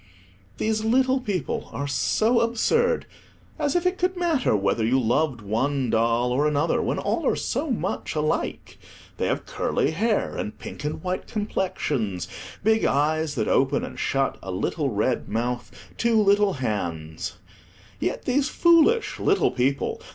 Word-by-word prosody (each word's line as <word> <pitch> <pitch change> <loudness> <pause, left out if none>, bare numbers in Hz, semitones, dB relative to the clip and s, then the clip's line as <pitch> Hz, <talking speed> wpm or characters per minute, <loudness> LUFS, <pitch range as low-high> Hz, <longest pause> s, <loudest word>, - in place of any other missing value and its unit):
These 215 0 0
little 260 +3 +3
people 195 - -3
are 140 +5 -3
so 220 - +2
absurd: 460 - +2 0.5
as 295 0 0
if 350 0 +1
it 365 +1 +1
could 365 +1 0
matter 325 - +2
whether 100 +2 +1
you 125 +4 +3
loved 130 +1 +1
one 125 +5 0
doll 115 +2 +2
or 140 +4 +2
another, 150 +2 +1
when - - -1
all - - -1
are - - +3
so 320 - -2
much 240 - -2
alike! 155 0 -2 0.4
They - - 0
have - - -1
curly 145 - 0
hair, 215 +6 0
and 105 - -4
pink - - -8
and 150 +1 -4
white 185 0 -3
complexions, 145 - -2 0.4
big 220 +2 +3
eyes 155 +2 +1
that 110 -4 -1
open 135 +1 +2
and - - -9
shut, 135 0 0
a 95 - -8
little 135 - -1
red 115 +3 -1
mouth, 120 +3 -2 0.3
two 235 -2 +3
little 205 -1 +4
hands. 85 - -3 0.7
Yet - - -2
these 270 +2 +1
foolish 350 +7 +4
little 405 - +2
people! 130 +2 -1
150 Hz, 150 wpm, -25 LUFS, -, 0.7 s, little